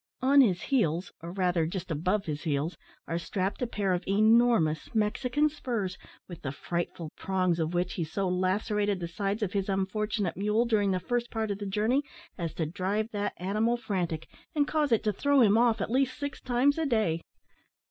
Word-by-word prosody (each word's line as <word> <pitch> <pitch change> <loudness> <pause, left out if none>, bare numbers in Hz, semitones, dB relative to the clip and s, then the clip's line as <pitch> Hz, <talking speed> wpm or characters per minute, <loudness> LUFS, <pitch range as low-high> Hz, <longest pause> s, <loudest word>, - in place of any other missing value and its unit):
On 275 +2 +7
his 185 -9 +2
heels, 180 - +1
or, 170 +1 -6
rather, 180 -3 +1
just 180 0 -5
above 185 +7 0
his 150 -2 -3
heels, 155 +1 -1 0.3
are 165 +1 -1
strapped 185 +5 -2
a 250 - +1
pair 200 -5 0
of 180 - -1
enormous 215 -5 +3
Mexican 250 +7 +2
spurs, 235 -11 -3 0.3
with 175 -3 -9
the 135 - -3
frightful 170 +1 -4
prongs 185 -3 0
of 165 +2 -1
which 180 +1 0
he 170 - -2
so 175 +5 -2
lacerated 200 +2 0
the 170 - -3
sides 200 +5 -2
of 190 - -2
his 200 -1 -1
unfortunate 195 0 -1
mule, 210 +4 +1
during 210 -4 +2
the 185 -1 +1
first 240 +5 -2
part 220 -2 -2
of 200 - -3
the 205 - -4
journey, 215 +8 +1 0.3
as 170 -3 -4
to 160 - -1
drive 195 +7 -2
that 205 -1 -2
animal 215 +6 +1
frantic, 180 -8 -2 0.3
and 290 -1 +2
cause 300 -3 +1
it 230 - +3
to 210 -2 +1
throw 285 +7 +3
him 210 -3 +5
off 230 -2 +3
at 210 - -2
least 260 0 +1
six 285 -1 -5
times 260 +5 +2
a 320 - +1
day. 215 -10 +1
200 Hz, 195 wpm, -29 LUFS, 175-230 Hz, 0.3 s, On